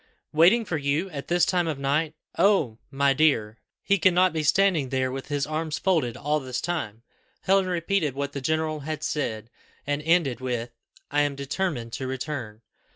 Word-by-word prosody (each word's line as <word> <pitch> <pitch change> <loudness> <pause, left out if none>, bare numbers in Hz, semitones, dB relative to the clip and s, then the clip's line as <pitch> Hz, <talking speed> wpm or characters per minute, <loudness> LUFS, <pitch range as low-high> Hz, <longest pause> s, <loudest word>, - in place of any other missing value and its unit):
"Waiting 185 +9 +5
for 170 - -2
you 150 +6 -1
at 140 -3 -6
this 175 0 +3
time 175 -2 +1
of 155 -3 -2
night! 145 +3 0 0.2
Oh! 155 - +2
my 140 0 +2
dear, 115 -7 +2 0.2
he 200 -1 +2
cannot 185 +1 +4
be 160 - -1
standing 155 -2 +3
there 130 -1 0
with 135 0 -6
his 145 -1 -1
arms 155 0 -2
folded 160 - +1
all 150 +1 0
this 130 -3 -4
time." 120 -11 -4 0.4
Helen 195 0 +3
repeated 170 -4 0
what 140 0 -3
the 140 - -5
general 155 +2 0
had 155 +1 -5
said, 115 -8 -3 0.3
and 145 +1 -1
ended 155 -6 +2
with, 120 -2 -3 0.4
"I 145 0 +3
am 145 -1 0
determined 140 -4 -3
to 130 - -4
return." 130 -5 -5
150 Hz, 175 wpm, -26 LUFS, 130-170 Hz, 0.4 s, Waiting